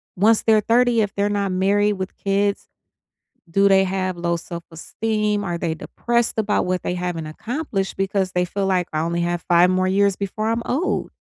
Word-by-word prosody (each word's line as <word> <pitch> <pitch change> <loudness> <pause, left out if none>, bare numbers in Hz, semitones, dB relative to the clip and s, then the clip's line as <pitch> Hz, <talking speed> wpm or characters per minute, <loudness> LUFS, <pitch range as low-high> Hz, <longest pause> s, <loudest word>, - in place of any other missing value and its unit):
once 215 +4 +4
they're 220 -1 +4
30, 235 +1 +3
if 205 -2 -1
they're 205 0 +1
not 200 -2 -1
married 200 +3 +2
with 190 -1 -5
kids, 200 0 0 0.8
do 195 +3 +4
they 195 0 +5
have 185 -1 -2
low 170 0 0
self-esteem, 205 +6 -3
are 175 -2 -2
they 165 -2 -2
depressed 235 +8 -1
about 210 -3 +1
what 180 0 -1
they 180 - -2
haven't 175 -3 -3
accomplished, 210 - -4
because 195 -1 -1
they 180 0 +1
feel 195 +2 -2
like, 185 -2 +1
"I 155 - -1
only 170 +2 -1
have 175 0 -1
5 175 +1 +5
more 185 0 +1
years 200 +1 +3
before 210 +2 -3
I'm 230 +1 -1
old?" 310 +9 -1
195 Hz, 185 wpm, -21 LUFS, 180-210 Hz, 0.8 s, they